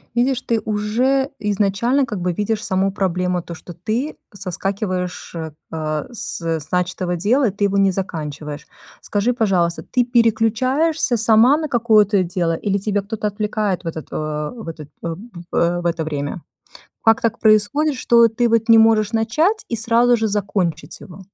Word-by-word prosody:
Видишь, 250 +1 +1
ты 230 -3 0
уже 240 +6 0
изначально 210 +6 +1
как 210 -6 -5
бы 180 0 0
видишь 210 +4 -2
саму 195 -3 0
проблему 180 -2 -1
то, 170 - -8
что 170 +2 -10
ты 220 - -3 0.2
соскакиваешь, 185 -1 -4
э, 155 -1 -5
с 230 - -6
с 160 -2 -3
начатого 180 0 -1
дела, 235 +7 +2
и - - -5
ты 205 +1 -1
его 200 0 0
не 195 -1 +4
заканчиваешь. 150 -5 -5 0.4
Скажи, 210 +4 0
пожалуйста, 185 -7 0
ты 250 -2 0
переключаешься 245 +5 +2
сама 230 +5 +5
на 315 0 -3
какое-то 215 -6 +3
дело 175 -1 -1
или 200 +4 -1
тебя 205 0 -1
кто-то 210 +1 -3
отвлекает 210 -2 -2
в 170 - -7
этот 160 -2 -5
э - - -6 0.4
в 220 - -9
этот 155 -3 -9 0.2
э, - - -2 0.4
в - - -5
э 175 +1 +1
в - - -10
это 170 -1 0
время? 145 +2 -4 0.6
Как 225 0 +5
так 230 -1 0
происходит, 220 +8 +3
что 235 -2 +4
ты 235 +2 0
вот 230 0 +1
не 225 - +8
можешь 220 -1 +4
начать 305 - +1
и 230 - -2
сразу 235 +2 +3
же 225 -1 0
закончить 195 -5 -2
его? 185 -1 -12
205 Hz, 170 wpm, -20 LUFS, 180-230 Hz, 0.6 s, не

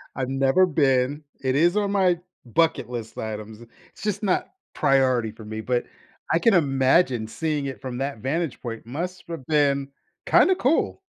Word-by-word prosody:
I've 130 -1 -2
never 135 +7 +3
been. 140 -2 +1 0.2
It 130 -1 0
is 175 +6 +3
on 205 -1 +1
my 185 -4 +2 0.3
bucket 160 +3 +1
list 120 -3 -6
items. 110 0 -6 0.3
It's - - -15
just 210 0 -2
not 190 -3 +1 0.3
priority 130 -5 +2
for 110 -1 -13
me, 110 +1 -5
but 120 +2 -1 0.5
I 165 - +4
can 225 +3 +4
imagine 135 -5 +3
seeing 150 +3 -2
it 135 - -7
from 125 -2 -5
that 135 -3 -3
vantage 145 +4 -2
point 115 -3 -6
must've 170 +2 -6
been 140 -3 +2 0.4
kinda 380 - +5
cool. 305 -2 +1
135 Hz, 160 wpm, -24 LUFS, 125-170 Hz, 0.5 s, kinda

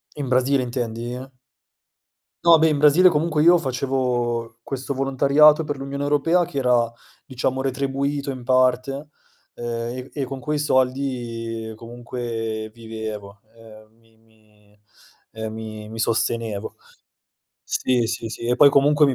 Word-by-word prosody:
In 145 -2 -4
Brasile 130 +1 +2
intendi? 120 +1 -4 1.2
No, 170 -1 +7
beh, 160 +1 +4
in 150 - +1
Brasile 150 +6 +6
comunque 155 -1 0
io 175 +3 +7
facevo 125 -4 -2
questo 135 +1 -4
volontariato 140 +3 +4
per 145 -1 -3
l'Unione 140 +1 -5
Europea 155 +5 +2
che 155 -5 -4
era, 125 -3 +2 0.4
diciamo 130 0 -2
retribuito 140 +1 -2
in 130 -2 -7
parte, 130 +3 +1 0.5
ehm, 120 +1 -4
e 130 +1 -8
e 145 - -2
con 135 +1 -6
quei 150 +3 -2
soldi 125 -5 -1
comunque 115 -1 -5
vivevo, 110 -3 -7
ehm, 110 -1 -16
mi 115 -1 -29
mi, 105 -2 -28 0.5
ehm, 110 0 -5
mi 110 -1 -7
mi 115 - -8
sostenevo. 115 -2 -1 0.9
Sì, 125 -2 0
sì, 115 0 -4
sì, 110 - -8
e 120 - +2
poi 145 - +8
comunque 145 +2 +4
mi 135 - +1
125 Hz, 135 wpm, -22 LUFS, 115-140 Hz, 1.2 s, poi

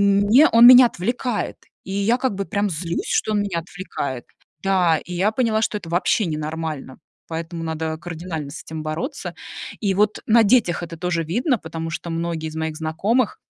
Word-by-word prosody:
мне 205 +8 +5
он 230 +1 +7
меня 250 0 +10
отвлекает. 240 +3 -2 0.3
И 190 - -7
я 205 +5 +1
как 255 -5 -1
бы 200 0 -3
прям 200 -1 -1
злюсь, 170 +1 -3
что 215 - +1
он 205 -1 +2
меня 180 -5 -2
отвлекает. 160 -8 -6 0.4
Да, 180 -5 +3
и 180 - -7
я 195 +5 +1
поняла, 225 -3 +1
что 210 - 0
это 165 - -11
вообще 180 +4 +1
ненормально. 155 -3 -4 0.3
Поэтому 165 +1 -5
надо 160 0 -3
кардинально 165 -3 -6
с - - -8
этим 160 -1 -7
бороться. 240 - -4 0.5
И 200 -3 +1
вот 210 +2 +2
на 230 +1 +6
детях 205 -6 +3
это 165 -1 -7
тоже 175 -1 -1
видно, 240 - 0
потому 165 0 -6
что 170 0 -5
многие 165 -1 -3
из 155 - -9
моих 160 -1 -3
знакомых 190 +9 0
180 Hz, 180 wpm, -22 LUFS, 160-215 Hz, 0.5 s, меня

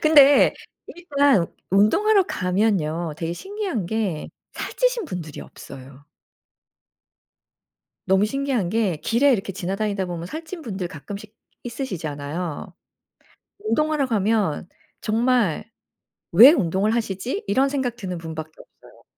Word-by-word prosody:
근데 290 -2 +6 0.3
일단 285 - +2 0.2
운동하러 385 - +4
가면요. 180 - 0
되게 165 0 -3
신기한 385 - -4
게 200 -7 -2 0.2
살찌신 - - -1
분들이 170 - -6
없어요. 135 +1 -12 2.0
너무 190 +2 +3
신기한 265 -6 -1
게 205 -5 0
길에 265 - +3
이렇게 195 -3 -1
지나다니다 195 +1 -2
보면 175 -1 -5
살찐 320 - -7
분들 190 -7 -4
가끔씩 200 +7 -9 0.3
있으시잖아요. 165 - -5 0.9
운동하러 305 -8 +1
가면 205 - 0 0.3
정말 225 -5 +1 0.7
‘왜 230 - +10
운동을 200 - +1
하시지?‘ 235 - -3
이런 270 +2 +3
생각 265 -4 -2
드는 185 -6 -5
분밖에 160 -1 -7
없어요. - - -18
210 Hz, 265 characters per minute, -23 LUFS, 175-275 Hz, 2.0 s, 왜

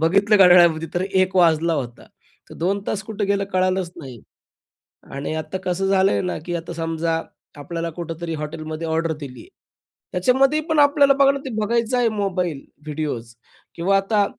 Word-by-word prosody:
बघितलं 200 +6 +3
घड्याळामध्ये 175 -4 +6
तर 175 - 0
1:00 190 -1 0
वाजला 165 -1 +3
होता. 120 -5 -5 0.5
तर - - -10
2 195 +4 -1
तास 205 - -2
कुठं 210 -2 -3
गेलं 200 0 +1
कळालंच 185 -1 0
नाही. 130 -8 -10 0.9
आणि 140 +3 -4
आता 155 +4 -4
कसं 185 +2 -1
झालंय 195 0 +3
ना 180 - -3
की 175 -1 -3
आता 170 0 -5
समजा 165 0 -2 0.4
आपल्याला 165 +3 -4
कुठेतरी 165 0 -5
हॉटेलमध्ये 155 +1 -5
ऑर्डर 160 0 0
दिली 135 -3 -9
आहे, 360 - -16 0.6
त्याच्यामध्ये 265 +10 +2
पण 315 -2 +2
आपल्याला 285 -1 +5
बघणं 275 0 +3
ते - - -4
बघायचं 235 +3 0
आहे 240 -2 +3
मोबाईल, 180 -7 -2 0.2
व्हिडिओज, 145 -7 -4 0.4
किंवा 190 +4 +2
आता 200 +1 +1
175 Hz, 160 wpm, -21 LUFS, 160-200 Hz, 0.9 s, घड्याळामध्ये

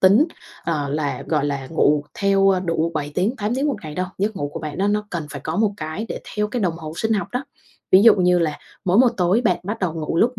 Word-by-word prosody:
tính, 200 +10 +6 0.4
ờ, 150 -4 -1
là, 145 0 -2
gọi 150 -3 +1
là, 140 -2 -2
ngủ 150 -1 +2
theo, 195 -1 +4
ơ, 185 -1 +2
đủ 165 -2 0
7 145 -1 -3
tiếng, 210 +8 0
8 210 +2 -1
tiếng 270 +3 0
một 280 - -1
ngày 155 -2 -7
đâu, 185 +2 -1
giấc 205 +1 -1
ngủ 145 0 -2
của - - -4
bạn 150 -2 -6
nó 200 +2 +2
nó 210 0 0
cần 165 -4 -3
phải 140 - -6
có 160 +4 -3
một 210 -1 +2
cái 160 +5 -4
để - - -5 0.2
theo 210 0 +1
cái 240 +2 -2
đồng 170 -3 0
hồ 155 -2 -7
sinh 220 0 0
học 205 - -1
đó. 250 +2 -2 0.5
Ví 190 +1 +8
dụ 230 - +8
như 180 -2 +3
là 160 -3 -1 0.3
mỗi 185 +4 +3
một 255 -1 +7
tối 185 +4 +3
bạn 180 -5 +3
bắt 210 +4 -4
đầu 180 -4 -1
ngủ 160 0 -3
lúc 240 +8 +2
180 Hz, 270 wpm, -22 LUFS, 155-210 Hz, 0.5 s, Ví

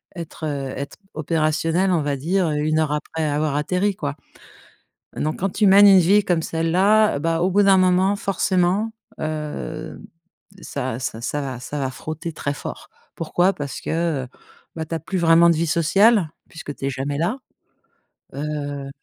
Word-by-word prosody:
être, 170 -2 -7
heu, 140 -3 -3
être 140 +1 -6 0.2
opérationnel, 160 +3 0
on 170 -3 +2
va 145 -1 -1
dire 170 +4 0
1 150 +1 0
heure 155 -2 0
après 160 +2 -3
avoir 150 0 0
atterri, 180 +7 0
quoi. 145 -5 -4 1.0
Donc 155 +1 -2
quand 195 - +1
tu 210 - +1
mènes 200 +1 +8
une 195 -1 +8
vie 200 +4 +4
comme 175 -4 +1
celle-là, 185 +4 +2
bah, 165 +1 0
au 180 +2 +2
bout 205 +2 +4
d'un 195 -1 +5
moment, 185 +2 +3
forcément, 195 +2 0 0.3
hem, 150 - -5 0.6
ça 130 -7 -4
ça 125 -3 -4
ça 145 +4 -2
va 130 -3 -5
ça 145 +3 -5
va 135 -2 -1
frotter 155 +5 -6
très 145 -2 -3
fort. - - -8 0.3
Pourquoi? 175 +3 +1
Parce 140 -3 -6
que, 160 -5 -1 0.5
bah, 160 - -3
tu 165 - -4
as - - -1
plus 185 +4 -3
vraiment 170 0 +5
de - - +3
vie 165 +2 0
sociale 190 +4 +3 0.2
puisque 160 -3 -8
tu 135 - -4
es - - 0
jamais 135 +2 -3
là, 180 - -1 1.0
heu. 145 -1 -4
160 Hz, 170 wpm, -22 LUFS, 145-185 Hz, 1.0 s, mènes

